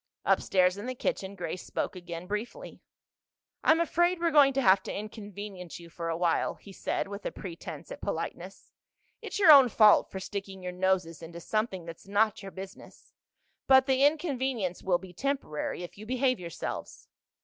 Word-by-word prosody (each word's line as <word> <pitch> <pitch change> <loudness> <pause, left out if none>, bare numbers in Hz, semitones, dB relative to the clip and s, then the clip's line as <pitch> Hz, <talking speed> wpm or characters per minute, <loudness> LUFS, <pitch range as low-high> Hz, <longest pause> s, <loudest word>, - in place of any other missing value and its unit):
Upstairs, 185 0 +3
in 205 +4 -6
the 255 - -3
kitchen, 200 -4 -3
Grace 180 -1 -5
spoke - - -3
again 175 -1 -7
briefly. 215 - -6 0.8
"I'm 320 +1 +5
afraid 345 +2 +2
we're 340 -1 +1
going 290 -3 +6
to 270 - +1
have 190 -1 +6
to - - -6
inconvenience 205 -4 -7
you 170 -1 -13
for 165 0 -4
a 165 - -1
while," 170 -1 +1
he 200 - -14
said - - -2
with 200 +1 -7
a - - -3
pretense 180 - -8
at - - -8
politeness. - - -5 0.5
"It's - - -5
your 375 -6 +8
own 275 -4 +9
fault 215 -2 +5
for 190 - -6
sticking 195 -1 -6
your 180 - -3
noses 180 -3 0
into 170 +1 -9
something 195 -1 -2
that's 165 +3 -10
not 210 +1 +2
your 195 -1 -8
business. 190 +2 -11 0.5
But 265 -1 +7
the 265 0 +2
inconvenience 265 - 0
will 180 -2 +2
be 180 0 -12
temporary 260 - -3
if 175 - -10
you 215 - -9
behave 255 -1 +1
yourselves." 170 -2 -6
200 Hz, 175 wpm, -29 LUFS, 180-255 Hz, 0.8 s, own